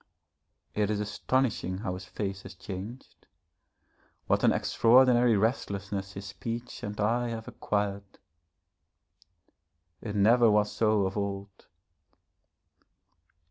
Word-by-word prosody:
It 105 -1 0
is 105 -1 0
astonishing 105 -2 -1
how 95 -2 -3
his 90 0 -7
face 100 -1 -4
has 95 0 -11
changed, 100 +7 -9 1.0
what - - +1
an - - +6
extraordinary 120 -1 +4
restlessness 100 -3 -2
his 100 0 -7
speech 115 +4 -6
and 105 0 -6
eye 120 +4 +1
have 115 -1 -6
acquired. 100 -1 -3 1.8
It 105 -2 -5
never 115 +3 +5
was 105 0 +3
so 110 -3 +2
of 95 +2 -3
old. 100 -1 -5
105 Hz, 105 wpm, -29 LUFS, 100-115 Hz, 1.8 s, an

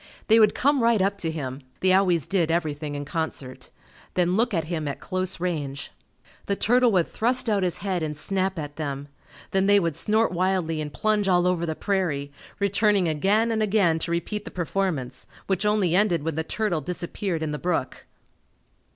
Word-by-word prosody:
They 225 +1 +7
would 215 -2 +5
come 280 0 +2
right 230 -2 +3
up 200 +1 0
to 165 - -1
him 140 -4 -5 0.2
(they 185 0 +4
always 180 -5 +3
did 180 -5 +1
everything 155 -3 -2
in 145 0 -4
concert) 145 -4 -4 0.5
then 180 0 +2
look 235 +3 +2
at 165 -5 0
him 155 -2 -3
at 140 - -4
close 185 0 -3
range. 150 -6 -3 0.6
The 200 - +1
turtle 245 +3 +3
would 175 -3 +3
thrust 245 +2 +1
out 205 -3 +2
his 180 -2 +1
head 185 -3 0
and 150 -2 -3
snap 190 +3 -1
at 145 -2 -6
them; 145 -2 -4 0.4
then 190 0 +2
they 205 0 +6
would 165 -5 -1
snort 215 +6 +2
wildly 180 -3 0
and 150 -1 -5
plunge 215 +1 0
all 180 -1 +3
over 175 -2 +1
the 160 - -2
prairie, 160 -9 -1 0.3
returning 200 -1 +2
again 200 +9 +2
and 220 -1 0
again 195 -6 +2
to 165 - -3
repeat 185 +5 -2
the 230 - -8
performance, 170 -8 -3 0.2
which 195 +2 0
only 205 -5 +2
ended 180 -6 +2
when 165 +1 -2
the 160 +2 -2
turtle 180 -2 -1
disappeared 175 +1 -3
in 155 - -2
the 150 - -4
brook. 170 -7 -2
180 Hz, 190 wpm, -25 LUFS, 160-200 Hz, 0.6 s, They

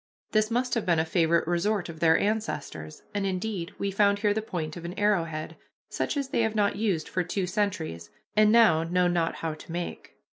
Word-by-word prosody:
This 215 0 +2
must 245 +1 0
have 230 - +1
been 170 -2 +2
a 160 - +2
favorite 165 -1 +2
resort 180 +3 0
of 165 -2 -9
their 160 -1 +5
ancestors, 175 - -3
and, 205 -1 -1
indeed, 190 -1 -2
we 200 - -2
found 200 +1 +3
here 205 0 +2
the 220 - -1
point 165 -7 -4
of 170 - -8
an 175 +2 -6
arrow 205 -5 +2
head, 155 -1 -6 0.3
such - - -2
as 275 -2 -2
they - - +1
have 220 -1 0
not 205 -1 +2
used 200 -7 -1
for 185 - -1
two 185 +2 -2
centuries 180 - -2 0.3
and 215 0 +5
now 220 -9 +6
know 180 +2 +1
not 170 -2 0
how 160 -1 -3
to 155 +1 -11
make. 175 +1 -5
185 Hz, 215 wpm, -27 LUFS, 165-210 Hz, 0.3 s, now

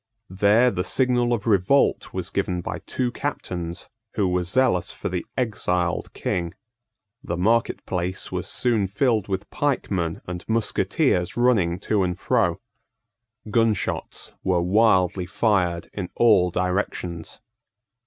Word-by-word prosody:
There 105 +6 +4
the 90 - -2
signal 125 +1 +1
of 115 -4 -1
revolt 110 +5 +2
was - - -4
given 90 -1 -1
by - - -5
two 125 -2 -1
captains 90 -11 -4 0.3
who 100 -3 +2
were 90 0 +1
zealous 90 -1 +1
for - - -5
the 90 -1 -4
exiled 90 -8 -1
King. 85 0 -2 0.7
The 85 - -3
market 115 +6 +1
place 90 0 -3
was - - -3
soon 115 -6 +1
filled 110 +1 +1
with 95 +1 -3
pikemen 100 - -1
and 90 0 -6
musketeers 105 -4 +1
running 105 -9 +3
to 105 -1 +1
and 90 -1 -1
fro. - - +1 0.9
Gunshots 115 -4 0
were 90 -2 +1
wildly 95 -2 +3
fired 90 -6 +1
in 95 -4 -4
all 105 -6 +5
directions. 90 -2 -3
95 Hz, 125 wpm, -24 LUFS, 90-115 Hz, 0.9 s, all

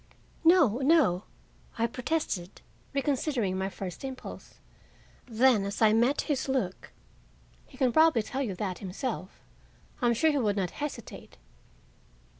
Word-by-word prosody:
"No, 325 - +5
no," 270 - +3 0.5
I 230 - +2
protested, 245 - -3 0.3
reconsidering 275 -7 0
my 190 +1 -2
first 185 0 -7
impulse. 265 -1 -8 0.7
Then, 235 -2 +3
as 200 +1 -4
I 215 -1 +5
met 240 +5 +3
his 285 -2 -2
look, 240 -9 -2 0.8
"He 260 - -16
can 255 -3 +2
probably 315 -8 +5
tell 265 +5 -4
you 215 -8 -2
that 185 -2 -4
himself. 195 +1 -5 0.6
I 245 - +3
am 235 - +3
sure 315 +7 +3
he 290 - 0
would 210 -4 0
not 185 -3 -1
hesitate." 290 -6 -7
240 Hz, 135 wpm, -29 LUFS, 200-275 Hz, 0.8 s, No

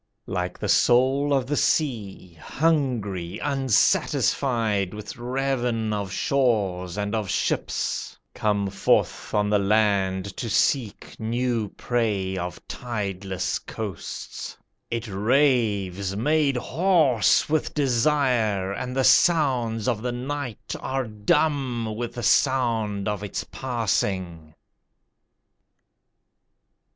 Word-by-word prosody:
Like 90 -1 -3
the - - -4
soul 135 +4 +3
of 135 -3 +2
the 145 +3 -1
sea 110 - -1
Hungry, 115 - -1
unsatisfied 115 -5 +1
With 105 0 -7
ravin 125 -3 -1
of 100 -2 -3
shores 100 -8 0
and 105 +1 -2
of 110 -4 -2
ships - - -2 0.2
Come 100 -2 0
forth - - +1
on 105 0 +2
the 105 - +4
land 100 -2 +1
to 115 - -3
seek 115 -1 0
New 115 -1 -1
prey 105 -6 -1
of 90 -1 -6
tideless 95 -5 -3
coasts, 105 -6 -7 0.3
It 115 0 -3
raves, 105 -4 +1
made 145 +4 +2
hoarse 150 - +3
with 155 0 -1
desire, 125 -7 +1
And 125 +5 -5
the 135 - +2
sounds 125 - +3
of 115 -4 0
the 125 +1 -2
night 125 -1 -5
are 135 -1 -2
dumb 120 +1 0
With 120 +1 -5
the 120 - -5
sound 115 -7 +2
of 105 -2 -2
its 105 - -4
passing. 95 -10 -2
115 Hz, 105 wpm, -24 LUFS, 100-130 Hz, 0.3 s, the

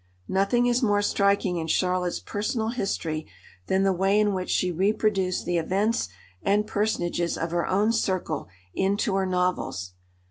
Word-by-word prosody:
Nothing 200 +6 +2
is 245 +1 +2
more 205 -3 +2
striking 200 -3 +2
in 160 -1 -3
Charlotte's 180 +1 0
personal 220 +2 -2
history 165 -9 -2 0.4
than 190 +1 +2
the 195 -1 +3
way 195 +3 +2
in 210 -1 +2
which 185 -1 -3
she 180 - +1
reproduced 195 0 +1
the 175 0 +1
events 195 - 0 0.3
and 210 +1 +2
personages 190 -5 -1
of 165 0 -3
her 170 0 0
own 205 +4 +2
circle 190 - -1 0.3
into 200 +2 0
her 190 -1 +1
novels. 180 - -1
195 Hz, 150 wpm, -26 LUFS, 180-210 Hz, 0.4 s, the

